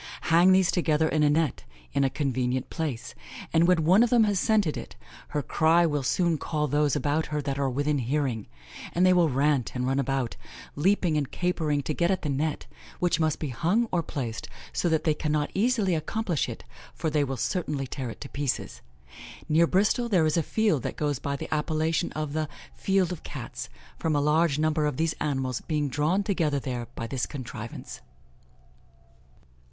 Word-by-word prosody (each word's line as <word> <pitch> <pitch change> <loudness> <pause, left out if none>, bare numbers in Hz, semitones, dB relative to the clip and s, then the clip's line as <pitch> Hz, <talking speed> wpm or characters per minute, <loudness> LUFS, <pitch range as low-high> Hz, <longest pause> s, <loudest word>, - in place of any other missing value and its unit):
Hang 175 +3 +7
these 185 -1 +4
together 160 -3 +2
in 155 -1 +1
a 150 - +5
net, 150 - +1 0.3
in 140 - +2
a 135 - +3
convenient 130 -2 -1
place, 150 -8 -4 0.4
and 165 +1 +4
when 180 -3 +3
one 185 +7 +5
of 240 - +4
them 235 -2 +5
has 205 -3 +1
scented 210 -8 +2
it, - - -7 0.3
her 150 - -2
cry 165 +5 +3
will 150 -3 0
soon 165 +4 +1
call 150 0 -1
those 145 +1 +2
about 145 +2 0
her 150 0 -2
that 140 -1 -3
are 135 -1 +1
within 145 +3 0
hearing; 125 -3 -1 0.5
and 180 +2 +3
they 185 - +6
will 175 -3 +4
rant 140 -1 +1
and 125 0 -1
run 135 +1 +1
about, 135 -3 -1 0.4
leaping 175 0 +2
and 145 -3 -1
capering 160 -5 0
to 155 - -2
get 170 +3 +1
at 190 -2 0
the 150 - -1
net, 145 +2 -1 0.3
which 175 -1 +1
must 155 -1 +1
be 150 - -4
hung 180 - +1
or 175 - +2
placed 125 -8 -5 0.2
so 175 - +1
that 160 -1 +1
they 155 - +3
cannot 150 -1 -1
easily 215 -3 +2
accomplish 170 +1 -1
it, - - -7 0.3
for 160 - -2
they 150 -1 +2
will 135 -1 -3
certainly 150 -1 -1
tear 130 -1 -5
it - - -9
to 140 - -5
pieces. 140 -2 -3 0.7
Near 165 +2 +4
Bristol 210 +7 +2
there 180 -7 +3
is 155 - +1
a 165 - +3
field 205 - +1
that - - -4
goes 145 -4 -1
by 140 0 -2
the - - -5
appellation 155 +1 0
of 155 -1 -3
the 155 -1 -1 0.2
'Field 190 -2 +1
of 180 - -5
Cats,' - - -7 0.3
from 160 -2 0
a - - +3
large 150 +1 +2
number 155 -1 +1
of 145 - -3
these 160 0 +1
animals 130 -4 -1
being 150 -3 -1
drawn 155 +9 +1
together 165 -8 0
there 125 -3 -4
by 115 - -4
this 125 +1 -2
contrivance." 120 -5 -7
150 Hz, 195 wpm, -27 LUFS, 140-170 Hz, 0.7 s, Hang